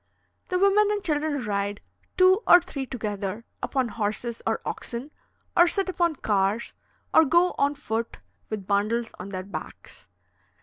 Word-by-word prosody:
The 365 Hz, -, 0 dB
women 400 Hz, +2 st, +4 dB
and 415 Hz, -1 st, -1 dB
children 295 Hz, -4 st, -1 dB
ride, 200 Hz, 0 st, -2 dB, 0.4 s
two 375 Hz, +3 st, +6 dB
or 350 Hz, -, +9 dB
three 280 Hz, -6 st, -6 dB
together, 210 Hz, -2 st, -4 dB, 0.2 s
upon 260 Hz, -3 st, -1 dB
horses 225 Hz, +2 st, -3 dB
or -, -, +1 dB
oxen, 245 Hz, +5 st, -5 dB, 0.4 s
or 345 Hz, 0 st, +7 dB
sit 385 Hz, +2 st, 0 dB
upon 345 Hz, -3 st, +1 dB
cars, 205 Hz, -1 st, 0 dB, 0.4 s
or 320 Hz, -, +8 dB
go 345 Hz, +4 st, +3 dB
on 285 Hz, +1 st, +2 dB
foot 230 Hz, -5 st, -4 dB, 0.3 s
with 210 Hz, -3 st, -4 dB
bundles 215 Hz, +4 st, 0 dB
on 195 Hz, -, -7 dB
their 185 Hz, -1 st, -4 dB
backs. 200 Hz, -, -9 dB
245 Hz, 145 wpm, -26 LUFS, 210-345 Hz, 0.4 s, or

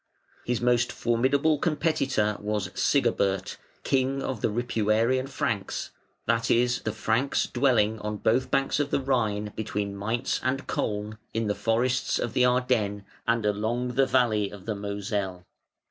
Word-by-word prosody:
His 120 Hz, -1 st, -1 dB
most 120 Hz, 0 st, +2 dB
formidable 135 Hz, +6 st, +2 dB
competitor 140 Hz, -, +1 dB
was 105 Hz, -3 st, -2 dB
Sigebert, 100 Hz, -8 st, +1 dB, 0.3 s
king 135 Hz, +1 st, +1 dB
of 125 Hz, -5 st, -3 dB
the -, -, +2 dB
Ripuarian 115 Hz, +3 st, +1 dB
Franks, -, -, -2 dB, 0.3 s
that 115 Hz, 0 st, +1 dB
is 120 Hz, +1 st, +2 dB
the 110 Hz, -, -2 dB
Franks 110 Hz, +5 st, 0 dB
dwelling 115 Hz, -4 st, +2 dB
on 105 Hz, 0 st, -3 dB
both 120 Hz, +5 st, +1 dB
banks 135 Hz, +1 st, +1 dB
of 145 Hz, -1 st, 0 dB
the -, -, +1 dB
Rhine 110 Hz, -6 st, 0 dB
between 105 Hz, -2 st, -3 dB
Maintz 110 Hz, +5 st, -1 dB
and 135 Hz, +2 st, -1 dB
Koln, 105 Hz, +1 st, -3 dB, 0.2 s
in 115 Hz, 0 st, 0 dB
the 105 Hz, -, +1 dB
forest 120 Hz, +4 st, +1 dB
of 115 Hz, -, -2 dB
the 125 Hz, +1 st, +4 dB
Ardennes 125 Hz, -5 st, +1 dB, 0.2 s
and 115 Hz, -1 st, +2 dB
along 110 Hz, +4 st, 0 dB
the 130 Hz, +2 st, +2 dB
valley 115 Hz, -6 st, +2 dB
of 100 Hz, -2 st, -11 dB
the 110 Hz, -, -1 dB
Moselle. 100 Hz, -2 st, -3 dB
115 Hz, 145 wpm, -27 LUFS, 105-130 Hz, 0.3 s, the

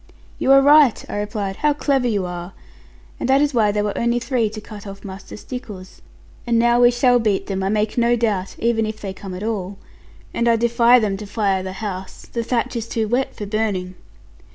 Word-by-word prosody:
'You 265 Hz, -, +2 dB
are 275 Hz, 0 st, +7 dB
right,' 290 Hz, -4 st, +5 dB
I -, -, -5 dB
replied; 205 Hz, -2 st, -3 dB
'how 300 Hz, -1 st, +2 dB
clever 275 Hz, -3 st, 0 dB
you 205 Hz, -5 st, 0 dB
are! 175 Hz, +1 st, -6 dB, 0.7 s
and -, -, -2 dB
that 270 Hz, +1 st, +5 dB
is 290 Hz, 0 st, +1 dB
why 215 Hz, -4 st, +3 dB
there 205 Hz, 0 st, -1 dB
were 205 Hz, -1 st, -2 dB
only 235 Hz, +1 st, +1 dB
three 240 Hz, -2 st, 0 dB
to 215 Hz, +1 st, -8 dB
cut 210 Hz, -1 st, -11 dB
off 195 Hz, +1 st, -10 dB
Master 195 Hz, +1 st, -9 dB
Stickles. 210 Hz, -6 st, -9 dB, 0.5 s
And 235 Hz, -1 st, +2 dB
now 240 Hz, +1 st, +3 dB
we 240 Hz, -, +7 dB
shall 245 Hz, 0 st, +3 dB
beat 210 Hz, -4 st, 0 dB
them, 195 Hz, -1 st, -3 dB
I 190 Hz, -, 0 dB
make 215 Hz, +2 st, 0 dB
no 235 Hz, 0 st, +3 dB
doubt, 210 Hz, -5 st, -1 dB
even 225 Hz, -1 st, +1 dB
if 215 Hz, 0 st, -6 dB
they 195 Hz, -2 st, -5 dB
come 190 Hz, -1 st, -8 dB
at 185 Hz, -, -6 dB
all. 200 Hz, -3 st, -3 dB, 0.6 s
And 235 Hz, -, 0 dB
I 230 Hz, -, +5 dB
defy 235 Hz, +1 st, +4 dB
them 210 Hz, -4 st, 0 dB
to 210 Hz, 0 st, -8 dB
fire 195 Hz, -2 st, 0 dB
the 185 Hz, 0 st, -6 dB
house: 190 Hz, -2 st, -7 dB
the 235 Hz, -, -4 dB
thatch 235 Hz, +1 st, -1 dB
is 230 Hz, -1 st, -3 dB
too 225 Hz, -1 st, -1 dB
wet 250 Hz, +4 st, -1 dB
for 210 Hz, -, -6 dB
burning.' 200 Hz, -3 st, -2 dB
220 Hz, 220 wpm, -21 LUFS, 195-240 Hz, 0.7 s, are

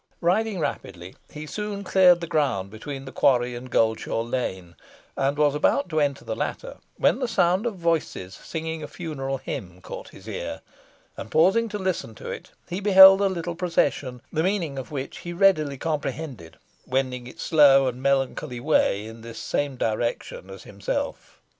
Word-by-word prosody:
Riding 205 Hz, +4 st, +1 dB
rapidly, 95 Hz, -, -5 dB, 0.2 s
he 150 Hz, 0 st, -7 dB
soon 205 Hz, +4 st, -5 dB
cleared 180 Hz, -2 st, +5 dB
the -, -, -2 dB
ground 140 Hz, -, 0 dB
between 135 Hz, +5 st, -7 dB
the 130 Hz, -, -8 dB
quarry 125 Hz, -2 st, +2 dB
and 120 Hz, +1 st, -8 dB
Goldshaw 110 Hz, -1 st, +1 dB
Lane, 95 Hz, -8 st, -4 dB, 0.4 s
and 140 Hz, +1 st, 0 dB
was 150 Hz, -1 st, +3 dB
about 150 Hz, +2 st, +1 dB
to 155 Hz, -1 st, 0 dB
enter 140 Hz, -2 st, 0 dB
the -, -, -3 dB
latter, -, -, -4 dB, 0.2 s
when -, -, +3 dB
the 255 Hz, -, -1 dB
sound 195 Hz, -1 st, +2 dB
of 225 Hz, -, -3 dB
voices 165 Hz, -, -1 dB
singing 160 Hz, -, -5 dB
a 150 Hz, -, -5 dB
funeral 135 Hz, -6 st, -4 dB
hymn 90 Hz, -7 st, -7 dB
caught -, -, -9 dB
his -, -, -15 dB
ear, -, -, -5 dB, 0.5 s
and, -, -, -8 dB
pausing 195 Hz, -, +3 dB
to 210 Hz, -, -4 dB
listen 185 Hz, -, -3 dB
to -, -, -7 dB
it, -, -, -8 dB, 0.2 s
he 180 Hz, +2 st, -4 dB
beheld 195 Hz, -1 st, +9 dB
a 200 Hz, -, +4 dB
little 175 Hz, -2 st, -3 dB
procession, 165 Hz, -7 st, -1 dB
the 160 Hz, -, +1 dB
meaning 170 Hz, -7 st, -1 dB
of 130 Hz, -, -8 dB
which 140 Hz, -2 st, -5 dB
he 175 Hz, -, -6 dB
readily 170 Hz, -7 st, +3 dB
comprehended, 140 Hz, -, -4 dB, 0.3 s
wending 130 Hz, -1 st, -1 dB
its -, -, -8 dB
slow 140 Hz, -4 st, +6 dB
and 125 Hz, 0 st, -4 dB
melancholy 135 Hz, -1 st, 0 dB
way 120 Hz, -7 st, +2 dB
in 115 Hz, +1 st, -10 dB
the 115 Hz, 0 st, -9 dB
same 145 Hz, -2 st, -2 dB
direction 115 Hz, -4 st, -2 dB
as 95 Hz, -1 st, -10 dB
himself. 100 Hz, -9 st, -5 dB
145 Hz, 170 wpm, -25 LUFS, 125-175 Hz, 0.5 s, beheld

